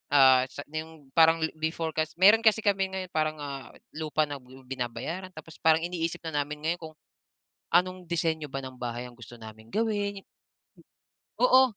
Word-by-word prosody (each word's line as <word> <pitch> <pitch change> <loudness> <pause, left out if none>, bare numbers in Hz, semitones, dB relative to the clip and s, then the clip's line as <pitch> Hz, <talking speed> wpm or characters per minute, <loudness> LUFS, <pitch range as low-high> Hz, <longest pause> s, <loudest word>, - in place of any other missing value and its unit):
ah, 130 -2 +7
sa 145 - -8
yung 155 -3 -7
parang 165 0 +6 0.2
before 160 0 -1
kas 155 0 0
meron 210 +5 +6
kasi 220 0 +5
kami 195 -1 +2
ngayon 190 -1 -5
parang, 155 0 0
ah, 140 -4 -6 0.2
lupa 155 0 0
na 145 - -4
binabayaran 130 +7 -6
tapos 160 0 -11
parang 160 0 +4
iniisip 170 0 -3
na 155 -3 -1
namin 150 0 -7
ngayon 170 +2 0
kung 155 - -15 0.8
anong 185 +1 +2
disenyo 160 -3 0
ba 135 - -3
ng 130 -1 -8
bahay 120 0 -4
ang 120 - -16
gusto 120 0 -11
naming 110 0 -11
gawin. 205 -3 0 1.2
Oo, 255 +1 +7
160 Hz, 165 wpm, -28 LUFS, 135-180 Hz, 1.2 s, ah